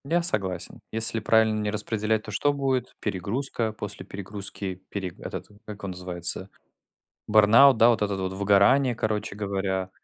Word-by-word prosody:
Я 170 +4 +1
согласен. 95 - -2
Если 110 0 +2
правильно 110 0 +3
не 105 0 -1
распределять, 110 +1 -1
то 105 - -8
что 145 +7 +1
будет? 130 -3 -1
Перегрузка. 110 +4 -2
После 105 -2 -7
перегрузки 100 -1 -6
пере 95 -2 -4
этот, - - -6 0.2
как 105 -1 -8
его 100 - -7
называется, 90 +1 -5 0.8
бёрнаут, 110 +6 +7
да, 115 +2 +6
вот 115 - +1
этот 100 -2 -1
вот, 95 0 -2
выгорание, 100 +7 +4
короче 110 -2 -2
говоря. 95 -2 -2
105 Hz, 150 wpm, -26 LUFS, 100-115 Hz, 0.8 s, бёрнаут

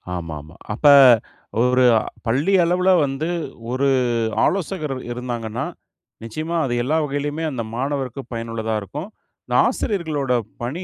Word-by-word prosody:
ஆமாமா. 80 -1 -7 0.2
அப்ப 110 - -6 0.8
ஒரு 125 +1 +4 0.4
பள்ளி 140 +12 +1
அளவில 180 +2 +2 0.2
வந்து 140 +4 -3 0.4
ஒரு 135 +2 +1 0.6
ஆலோசகர் 175 -6 -1 0.2
இருந்தாங்கன்னா, 120 -1 -4 0.6
நிச்சயமா 155 +9 -4
அது 125 - -2
எல்லா 150 +6 +1
வகையிலுமே 145 +3 -3
அந்த 120 -4 -3
மாணவருக்கு 135 0 -2
பயனுள்ளதா 115 -1 -3
இருக்கும். 150 - -7 0.6
ஆசிரியர்களுட 155 - -1 0.3
பணி 145 +10 -3
135 Hz, 105 wpm, -21 LUFS, 115-155 Hz, 0.8 s, ஒரு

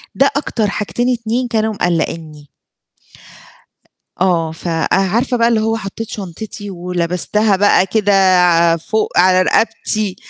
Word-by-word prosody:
ده 275 +1 +3
أكتر 235 -6 -1
حاجتين 240 +5 -1
2 235 +1 -2
كانوا 220 -1 -1
مقلّقينّي. 160 -5 -3 1.7
آه، 170 -4 +1
فأه 165 0 -3
عارفة 230 +7 +1
بقى 230 0 +3
اللي 230 -2 +2
هو 225 +1 0
حطّيت 215 +2 -7
شنطتي 205 +2 -7
ولبستها 180 +3 -1
بقى 205 -1 +3
كده 205 +1 0 0.7
فوق 215 +6 -2
على 185 +1 +5
رقبتي، 215 0 0
205 Hz, 115 wpm, -16 LUFS, 180-225 Hz, 1.7 s, على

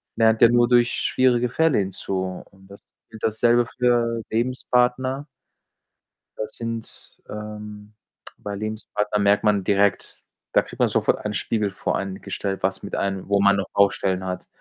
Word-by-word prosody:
lernt 110 0 +3
ja 115 - +8
nur 120 0 +4
durch 120 -1 +4
schwierige 125 -2 +2
Fälle 160 -3 +2
hinzu 95 -1 -3
und 95 0 -20
das 100 0 -15 0.3
und 110 - -11
dasselbe 120 +2 +3
für 120 -1 0
Lebenspartner 125 +3 0 1.1
Das 110 0 -4
sind, 115 -1 -7
ähm 105 0 -8 0.5
bei 100 0 -5
Lebenspartnern 105 0 -2
merkt 100 +1 +3
man 105 -3 +2
direkt 100 -1 0 0.3
da - - +5
kriegt - - -13
man - - +4
sofort - - +1
einen 105 0 -3
Spiegel 105 -2 -1
vor 100 - -2
einen 95 -1 -5
gestellt, 95 -1 -4
was 95 0 -1
mit 100 - -5
einem 95 -1 -2
wo 100 0 +2
man 100 0 +4
noch 100 - -2
Baustellen 95 -2 +2
hat. 90 0 -5
105 Hz, 155 wpm, -23 LUFS, 100-120 Hz, 1.1 s, ja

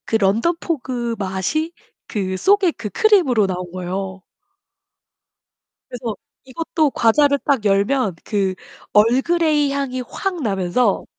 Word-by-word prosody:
그 - - -1
런던 225 - +2
포그 245 -6 -3
맛이 200 - -2 0.3
그 190 -3 -2
속에 390 - +3
그 225 -8 -7
크림으로 265 - +3
나온 180 -1 -4
거예요. 190 +1 -5 1.7
그래서 235 -3 -4 0.3
이것도 305 +2 -1
과자를 280 +6 +3
딱 270 -7 +1
열면 200 +1 +2
그 195 -3 -1 0.4
얼그레이 295 +6 +3
향이 270 -2 -2
확 375 -4 -3
나면서 195 0 0
235 Hz, 230 characters per minute, -20 LUFS, 195-295 Hz, 1.7 s, 속에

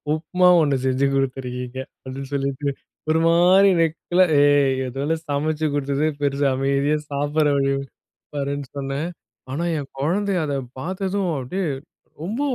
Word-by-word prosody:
உப்மா 180 +3 +2
ஒண்ணு 140 -3 +2
செஞ்சு 130 +1 +2
குடுத்திருக்கீங்க." 130 -1 -3 0.2
அப்டின்னு 135 +1 -7
சொல்லிட்டு, 140 +1 -2 0.4
ஒரு 160 - +3
மாரி 180 +4 +6
நக்கலா, 175 +3 +2 0.2
"ஏய்! 145 -2 +4
ஏதோ 135 +2 -5
நான் 165 0 -2
சமச்சு 155 +2 0
குடுத்ததே 140 +2 0
பெருசு. 140 0 +1
அமைதியா 140 +3 +1
சாப்டுற 145 +2 +1
வழிய 135 0 +2 0.6
பாருன்னு 140 0 -2
சொன்னேன்." 140 +4 -2 0.4
ஆனா, 150 +6 -2
என் 140 -2 -5
கொழந்தை 195 +7 0
அத 145 -2 -2 0.3
பாத்ததும், 190 +4 -2
அப்டியே 185 +10 -3 0.6
ரொம்ப 220 +10 -3
145 Hz, 130 wpm, -22 LUFS, 135-165 Hz, 0.6 s, மாரி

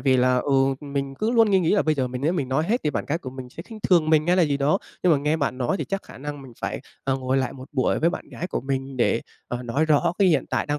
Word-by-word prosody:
vì 130 0 +3
là, 125 0 +3
ừ, 140 +3 0 0.3
mình 140 -1 -3
cứ 215 +11 -1
luôn 230 -3 +4
nghi 195 - +5
nghĩ 165 - +1
là 205 - +3
bây 155 -1 +2
giờ 130 -3 -1
mình 125 0 -5
nếu 160 +4 +2
mình 140 -8 -2
nói 135 +4 +1
hết 240 +3 +2
thì 150 - +2
bạn - - -2
gái 160 +4 -1
của 130 -6 -7
mình 130 -1 -8
sẽ 165 - -9
khinh 220 +2 -11
thường 165 -4 +3
mình 155 0 +4
hay 180 +1 +3
là 180 - +5
gì 145 -3 +2
đó. 145 +7 +2 0.2
Nhưng 180 -2 +5
mà 145 - +4
nghe 150 +3 +1
bạn 140 -4 -1
nói 125 +8 0
thì - - -3
chắc 195 0 -3
khả - - -13
năng 145 0 -6
mình 130 - -12
phải, - - -3 0.2
ờ, 135 -1 +1
ngồi 130 0 -1
lại 130 -2 0
một 130 0 -11
buổi 130 -3 +1
với 170 +2 +3
bạn - - -7
gái 175 - -5
của - - -3
mình 135 0 -3
để, 120 -1 +2 0.3
ờ, 125 0 -4
nói 130 +6 0
rõ 160 +2 +3
cái 195 - +5
hiện 155 -6 +3
tại - - 0
đang 145 0 -1
145 Hz, 325 wpm, -24 LUFS, 130-165 Hz, 0.3 s, nghi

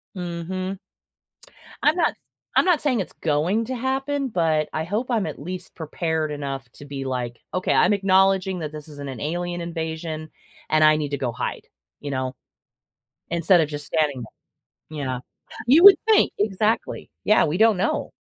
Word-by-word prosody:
Mhm. 185 +2 -4 1.0
I'm 305 +4 +4
not 340 - +3
s - - -19 0.4
I'm - - +6
not 355 -4 +3
saying 260 -6 +1
it's 185 - -5
going 170 +9 +1
to 260 0 -3
happen, 270 +2 -1
but 160 -6 +1
I 155 - -1
hope 210 +9 -2
I'm 220 -7 0
at 155 - -6
least 180 +4 -7
prepared 160 -1 -2
enough 135 -3 -5
to 145 - -12
be 140 -1 -6
like, 125 -2 -4
"Okay, 185 - 0
I'm - - +4
acknowledging 190 -1 +3
that 155 -2 -5
this 150 0 -9
is 145 -1 -11
an 140 -1 -6
an 130 -4 -7
alien 175 +3 -3
invasion, 160 -1 -5 0.4
and 155 0 +3
I 155 0 +6
need 150 -2 -3
to 140 - -1
go 130 -3 -1
hide," - - -5 0.3
you 145 - -5
know, 130 -1 -2 0.9
instead 170 +1 +4
of 155 - +1
just 145 -1 -6
standing 150 -6 0 0.5
there, 155 -1 -13
you 140 - -2
know. 130 -1 -3 0.5
You 310 +9 +6
would 400 - +12
think. 440 -2 +4
Exactly. 210 +2 -1
Yeah. 215 - +5
We 155 +4 -1
don't 220 -2 +5
know. - - -1
165 Hz, 180 wpm, -23 LUFS, 150-195 Hz, 1.0 s, would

